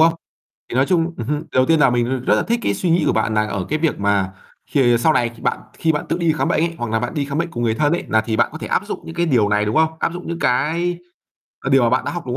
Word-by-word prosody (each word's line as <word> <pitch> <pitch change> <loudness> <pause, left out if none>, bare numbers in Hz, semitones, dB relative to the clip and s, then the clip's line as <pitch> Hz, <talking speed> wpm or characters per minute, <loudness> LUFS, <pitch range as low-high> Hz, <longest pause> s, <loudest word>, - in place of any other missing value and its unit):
không? 165 +1 +6 0.6
Thì - - -7
nói 130 +2 +3
chung 170 -2 +1
ừm 115 - -4
hưm, 150 +3 0
điều 160 - -8
đầu 130 0 +3
tiên 160 -2 +3
là 135 - +5
mình 120 -1 +1 0.2
r - - -16
rất - - +6
là - - +1
thích 235 0 -1
cái - - 0
suy 180 - -1
nghĩ 165 -1 +3
của - - +3
bạn 110 - 0
là 110 0 +2
ở 100 -3 -3
cái 155 - 0
việc 160 0 0
mà 100 -2 +1 0.4
khi 120 -4 +3
sau 155 +6 +3
này 120 -4 +2
khi - - -16
bạn - - 0 0.2
khi 160 -1 +2
bạn 150 - -3
tự 165 - -1
đi 170 -2 +2
khám 155 - -1
bệnh - - +1
ấy, 170 0 -3
hoặc 120 -2 -3
là 110 - +1
bạn 120 - -4
đi 145 -3 -1
khám 140 +2 -4
bệnh 170 +1 -1
cùng 120 -5 -4
người 110 -1 +1
thân 150 +4 +1
ấy 175 - -1
là 110 - +3
thì 110 0 -2
bạn - - +3
có - - -7
thể - - -6
áp - - -1
dụng - - -5
những 165 - -8
cái 170 0 0
điều 120 -9 +3
này, 105 0 +2
đúng 105 - -2
không? 160 0 +3
Áp 165 - 0
dụng 175 0 -8
những 170 0 -4
cái 170 +6 0 0.7
là 135 - -1
điều 135 -1 +5
mà 120 - +3
bạn 130 - +1
đã - - -2
học, 175 - -4
đúng 125 0 -2
145 Hz, 345 wpm, -20 LUFS, 120-165 Hz, 0.7 s, không